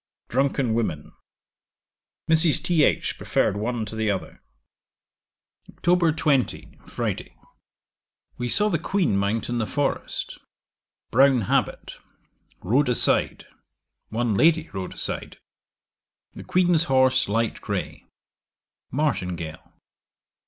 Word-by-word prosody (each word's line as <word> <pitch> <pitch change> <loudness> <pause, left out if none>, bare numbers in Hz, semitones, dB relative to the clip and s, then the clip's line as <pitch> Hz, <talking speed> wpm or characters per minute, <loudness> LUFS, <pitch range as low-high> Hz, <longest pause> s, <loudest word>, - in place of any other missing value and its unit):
Drunken 135 -2 0
women. 95 -10 -2 1.2
Mrs. 160 -1 +6
Th. 160 -4 +2
preferred - - 0
one 115 +2 -2
to 105 - -7
the 110 -1 -1
other. 95 -2 -4 1.4
'Oct. 175 -3 +3
20. 140 -5 0 0.2
Friday. - - -4 1.0
We 120 0 -4
saw 210 - +4
the 170 -5 0
Queen 180 - 0
mount 100 +3 -1
in 120 0 -2
the 110 - -1
forest 145 -1 -3 0.7
Brown 130 +1 +4
habit; 95 - -1 0.7
rode 125 +8 +2
aside: 125 - +1 0.6
one 115 0 -1
lady 160 +7 +3
rode 95 -2 -5
aside. - - -4 1.0
The - - -10
Queen's 175 -2 +2
horse 130 - +3
light 115 +2 -1
grey; - - -5 0.8
martingale. 90 - -3
125 Hz, 100 wpm, -24 LUFS, 110-155 Hz, 1.4 s, Mrs